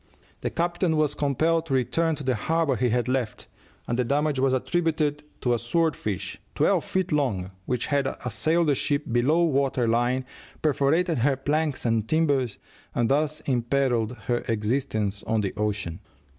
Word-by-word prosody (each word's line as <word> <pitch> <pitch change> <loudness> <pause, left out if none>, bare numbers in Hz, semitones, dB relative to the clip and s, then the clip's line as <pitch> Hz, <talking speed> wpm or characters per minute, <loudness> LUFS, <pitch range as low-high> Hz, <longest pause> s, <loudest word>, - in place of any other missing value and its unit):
The - - -2
captain 170 -1 0
was 150 -1 +2
compelled 160 +4 +1
to 135 - 0
return 160 +6 +1
to 145 - -8
the 130 -1 +1
harbor 155 +5 +1
he 125 0 +1
had 120 +1 +1
left, 125 -4 -2 0.4
and 120 - -1
the - - +3
damage 145 +2 0
was 135 0 +3
attributed 150 +1 0 0.2
to 125 - +2
a 120 - 0
sword 160 +7 +1
fish, 100 -4 -4
twelve - - +2
feet 185 -1 -1
long, 110 -11 0 0.2
which 125 -2 -1
had 140 -2 +1 0.2
assailed 160 +6 +2
the - - +5
ship 145 +2 0
below 140 +9 +3
water 135 -5 +1
line, 120 +3 +1 0.4
perforated 155 +2 +2
her 135 +3 +3
planks 145 +1 -1
and 115 -2 +1
timbers, 140 -8 +1 0.4
and 120 -1 +1
thus 150 +2 +1
imperilled 125 -2 +1
her 120 -1 +1
existence 110 -2 -1
on 110 0 +1
the 100 - -2
ocean. 100 -5 -2
135 Hz, 165 wpm, -26 LUFS, 120-155 Hz, 0.4 s, the